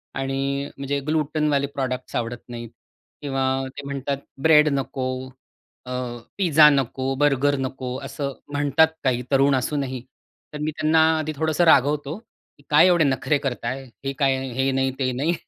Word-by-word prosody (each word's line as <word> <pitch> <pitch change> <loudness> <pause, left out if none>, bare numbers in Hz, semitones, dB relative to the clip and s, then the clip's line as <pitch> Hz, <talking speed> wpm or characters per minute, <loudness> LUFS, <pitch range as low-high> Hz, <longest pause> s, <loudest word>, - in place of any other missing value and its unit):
आणि 135 +1 -2
म्हणजे 140 +1 -2
ग्लुटेनवाले 150 -2 +1
प्रॉडक्ट्स 130 -2 -4
आवडत 120 +1 -3
नाहीत 120 -1 -7 0.5
किंवा 135 -2 -2 0.3
ते 145 - -6
म्हणतात, 140 0 -3 0.2
"ब्रेड 150 0 +6
नको 130 -1 -3 0.6
अ, 125 - -7 0.5
पिझ्झा 155 -5 +6
नको, 135 -1 0
बर्गर 145 -1 +3
नको." 130 -1 -4
असं 140 0 -4 0.2
म्हणतात 145 +2 +4 0.2
काही 125 -2 +1
तरुण 135 0 +4
असूनही. 130 -1 -2 0.5
तर - - -5
मी 155 - -1
त्यांना 155 +1 +2 0.2
आधी 155 0 -2
थोडंसं 160 +2 +1
रागवतो 145 +1 +3 0.4
की - - -22
"काय - - +6
एवढे 175 -3 +4
नखरे 135 +1 +1
करताय? 135 -1 -3 0.2
हे 135 - -1
काय, 135 -2 +3 0.2
हे 135 +2 +1
नाही 135 0 +1
ते 130 -1 +1
नाही?" 145 +7 0
140 Hz, 145 wpm, -23 LUFS, 130-150 Hz, 0.6 s, ब्रेड